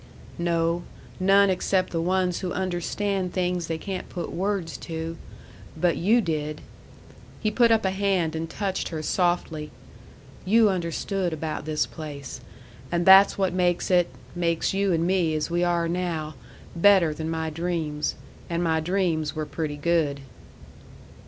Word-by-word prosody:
"No; 170 0 +1 0.4
none 195 +1 +5
except 185 0 0
the 165 - -1
ones 180 0 +1
who 185 -2 -3
understand 185 +1 -2
things 180 -2 -1
they 165 - -2
can't 185 +2 -5
put 175 - -5
words 190 -3 -2
to. 165 0 -5 0.6
But 170 +1 +2
you 220 +7 +3
did!" 155 -4 -3 0.8
He 215 - 0
put 235 +1 +4
up 225 -2 +3
a 190 - +2
hand 190 -5 0
and 160 +1 -3
touched 190 +2 -2
her 155 -2 -4
softly. 170 -3 0 0.7
"You 215 +2 +4
understood 180 +1 -2
about 155 -1 -4
this 155 -1 0
place. 145 -4 -8 0.5
And 170 0 0
that's 195 +1 +8
what 190 -2 +1
makes 180 0 +1
it 175 -1 +4 0.3
makes 170 0 0
you 195 0 +1
and 165 -1 +1
me 175 -4 +1
as 155 +2 -2
we 175 +1 +1
are 170 -1 +1
now 165 -3 -2 0.4
better 175 -3 +5
than 160 +1 -4
my 160 -1 -2
dreams. 155 -2 -2 0.3
And 170 0 -1
my 160 -1 +2
dreams 165 -3 0
were 155 0 -2
pretty 150 -2 -4
good." 150 -3 +1
175 Hz, 150 wpm, -25 LUFS, 160-190 Hz, 0.8 s, that's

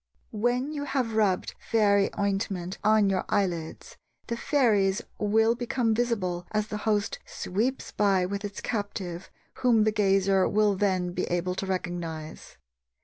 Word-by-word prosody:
When 245 +6 0
you 285 -1 -3
have 260 -5 -1
rubbed 205 -4 +1
fairy 200 -3 +3
ointment 195 -2 -2
on 215 -1 +4
your 190 -1 +1
eyelids, 170 -5 -2 0.3
the 235 - -3
fairies 215 -8 +2 0.2
will 220 +2 +3
become 240 -1 0
visible 205 -7 -1
as 215 0 -1
the 210 - -3
host 210 0 0
sweeps 230 +8 -2
by 195 -3 +2
with 200 +2 -4
its 205 -1 -5
captive, 195 -5 -4 0.3
whom 235 -4 +4
the 215 - +2
gazer 195 -2 +3
will 210 -1 +3
then 185 -3 0
be 180 +1 -2
able 175 +1 -1
to 190 +1 -4
recognize. 170 -4 -5
205 Hz, 145 wpm, -27 LUFS, 185-220 Hz, 0.3 s, on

